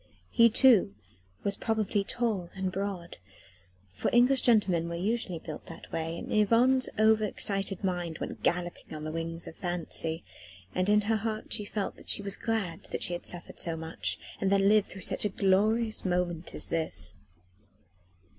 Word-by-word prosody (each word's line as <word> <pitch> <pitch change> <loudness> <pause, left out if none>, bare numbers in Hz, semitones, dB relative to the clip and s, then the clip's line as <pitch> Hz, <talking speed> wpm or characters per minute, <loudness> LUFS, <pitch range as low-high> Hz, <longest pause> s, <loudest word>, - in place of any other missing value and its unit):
He 230 -1 +6
too 220 - +5 0.5
was 200 - +1
probably 215 -3 0
tall 210 -6 -1
and 190 -1 -2
broad 190 -3 -4 0.8
for - - -1
English 250 +2 +5
gentlemen 190 -8 +3
were 170 - -4
usually 195 0 -1
built 155 -1 -8
that 165 - -11
way; 165 +1 -3
and - - -5
Yvonne's 240 +5 +4
over 220 0 +4
excited 195 -2 0
mind 175 -3 -2
went - - -6
galloping 175 -2 -2
on 155 - -7
the 155 - -4
wings 165 +1 -3
of - - -10
fancy, 170 -3 -2 0.5
and 185 +2 0
in 210 0 +5
her 220 +2 +1
heart 215 0 -3
she 210 - 0
felt 205 -1 -3
that - - -10
she 200 - +3
was 200 0 -2
glad 215 -8 -2
that - - -4
she 175 - -1
had 175 - -2
suffered 175 -1 -2
so 165 -1 0
much, 160 0 -2 0.2
and 195 - +1
then 195 0 +4
lived 210 -1 +4
through 190 - -10
such - - 0
a 210 - +2
glorious 215 +4 +2
moment 180 -2 -1
as - - -4
this. 165 -1 -1
195 Hz, 175 wpm, -29 LUFS, 170-215 Hz, 0.8 s, He